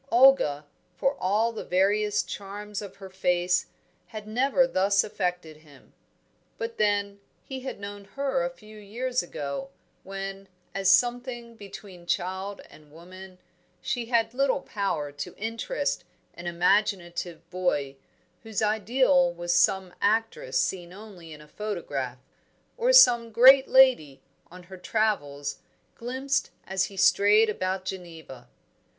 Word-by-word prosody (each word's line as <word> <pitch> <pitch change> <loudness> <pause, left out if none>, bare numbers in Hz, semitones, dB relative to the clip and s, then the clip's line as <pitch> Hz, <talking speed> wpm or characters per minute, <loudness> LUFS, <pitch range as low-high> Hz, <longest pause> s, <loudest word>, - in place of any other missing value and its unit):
Olga, 235 - +4 0.3
for 270 +9 0
all 210 +5 +1
the 225 - -6
various 205 +3 +1
charms 205 +1 -7
of 205 - -9
her 195 -1 -11
face, 180 -1 +1 0.4
had 215 -2 -9
never 265 +4 +2
thus 200 -4 +2
affected 180 -6 -3
him. 150 -3 -20 0.6
But 230 0 -5
then, 205 -1 0 0.2
he 265 -1 -7
had 260 -4 -7
known 200 0 -8
her 270 -1 0
a 260 - -1
few 215 -4 -15
years 245 +5 -2
ago, 160 - -6 0.3
when, 195 0 -7 0.3
as 195 -1 +1
something 240 +2 +1
between 195 -4 -12
child 190 +3 -3
and 150 -1 -18
woman, 185 +3 -13 0.4
she 260 -2 -3
had 230 -1 +1
little 275 +1 +1
power 180 - -3
to 145 0 -7
interest 230 - -3 0.3
an 175 0 -8
imaginative 175 -2 0
boy, 145 -7 -1 0.5
whose 220 -2 -4
ideal 260 +5 +3
was 175 -7 -2
some 190 -1 +2
actress 210 - 0
seen 175 -2 -2
only 190 -4 -12
in 150 -1 -11
a 150 - -15
photograph, 150 - -4 0.6
or - - +2
some 240 - +7
great 260 +4 +7
lady 250 - +4 0.3
on 180 +1 -13
her 190 +1 -11
travels 180 -9 -2 0.3
glimpsed 260 +3 -2 0.2
as 190 0 0
he 195 - -11
strayed 205 +3 +5
about 185 -1 -3
Geneva. 165 -10 -9
200 Hz, 130 wpm, -26 LUFS, 180-230 Hz, 0.6 s, some